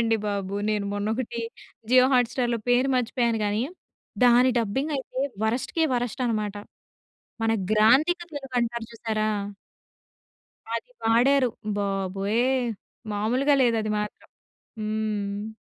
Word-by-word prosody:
వత్తున్నాయండి 225 -1 +2
బాబు. 200 -1 -3 0.2
నేను 210 -1 -1
మొన్నొకటి 225 +3 -2 0.5
జియో 255 0 +7
హాట్‌స్టార్‌లో 245 -1 +1
పేరు 245 +2 +3
మర్చిపోయాను 235 -1 +1
గానీ 210 +2 0 0.6
దాని 245 +1 +6
డబ్బింగ్ 250 +7 -1
అయితే 260 -1 -6 0.3
వరస్ట్‌‌‌‌‌‌‌కే 255 +8 0
వరస్ట్ 245 +1 -2
అనమాట. 210 -3 -1 0.9
మన 225 - +2 0.2
గ్రాంథిక 260 - +4
తెలుగు 275 -2 -6
అంటారు 235 -1 -2
చూసారా! 215 -1 -1 1.5
అది 365 - -4
వాడారు. 250 +3 +4 0.3
బాబోయ్! 195 +2 0 0.7
మాములుగా 250 +8 +2
లేదు 235 -2 +3
అది 215 - -2
మాత్రం. 210 0 -6 0.5
హ్మ్. 215 -1 -2
230 Hz, 110 wpm, -25 LUFS, 210-250 Hz, 1.5 s, జియో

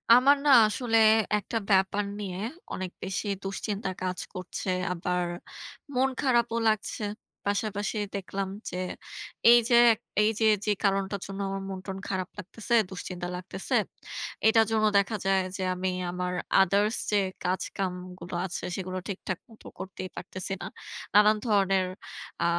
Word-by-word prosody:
আমার 275 +3 +6
না - - +4 0.2
আসলে 225 +1 +1 0.4
একটা 210 +3 -3
ব্যাপার 195 +1 +3 0.2
নিয়ে 190 -3 -4 0.4
অনেক 185 -1 -4
বেশি 190 +3 -3 0.2
দুশ্চিন্তা 195 +1 -3
কাজ 185 -1 -2
করছে 185 0 -5 0.2
আবার 180 +1 -1 0.7
মন 260 +1 +3
খারাপও 240 -4 +2
লাগছে। 215 0 0 0.4
পাশাপাশি 205 +1 -1 0.2
দেখলাম 195 0 -3 0.2
যে, 180 - -5 0.7
এই 240 - +9
যে 240 - +5 0.2
এক 220 - -9 0.2
এই 210 - +4
যে, 225 - +3 0.2
যে 210 - +2
কারণটার 195 0 +1
জন্য 195 0 -6
আমার 195 0 -3
মনটন 190 0 -5
খারাপ 185 -2 -2
লাগতেছে, 205 +4 -5 0.2
দুশ্চিন্তা 180 -1 -5
লাগতেছে, 180 +1 -3 0.7
এটার 225 0 +6
জন্য 215 -1 +3
দেখা 200 +2 +2
যায় 195 -1 +3 0.2
যে 190 - -2
আমি 185 +1 -1 0.2
আমার 180 0 -2 0.3
others 200 +4 +3 0.2
যে 210 - +4 0.3
কাজকামগুলো 180 -1 -3
আছে 185 - -5
সেগুলো 185 -1 -4
ঠিকঠাক 190 -2 -4
মতো 225 - -18
করতেই 185 0 -6
পারতেছি 185 0 -5
না। - - -4 0.5
নানান 210 +1 +6
ধরনের 195 -4 +3 0.6
আ - - +2
195 Hz, 140 wpm, -28 LUFS, 185-215 Hz, 0.7 s, এই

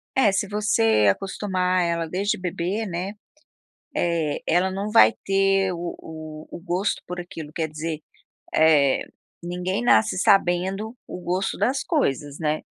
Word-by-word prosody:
É 265 -7 +4
se 195 +1 0
você 115 - +2
acostumar 185 - 0
ela 170 -1 -1
desde 195 +5 -1
bebê, 185 +4 -2
né, 185 +1 -4 0.8
eh, 165 -4 0
ela 180 +3 +2
não 200 +2 -3
vai 225 0 +7
ter 195 -1 +2
o 170 0 -5
o 155 -1 -9
o - - -7
gosto 180 +3 -1
por 180 0 -5
aquilo, 165 -3 -8
quer 165 -2 -1
dizer, 155 +1 -4 0.5
eh, 150 -4 +4 0.4
ninguém 180 +5 -2
nasce 220 -4 +4
sabendo 195 +4 +2
o - - -7
gosto 180 +2 -2
das 265 +3 0
coisas, 145 - -1
né? 155 -1 0
180 Hz, 140 wpm, -24 LUFS, 160-195 Hz, 0.8 s, vai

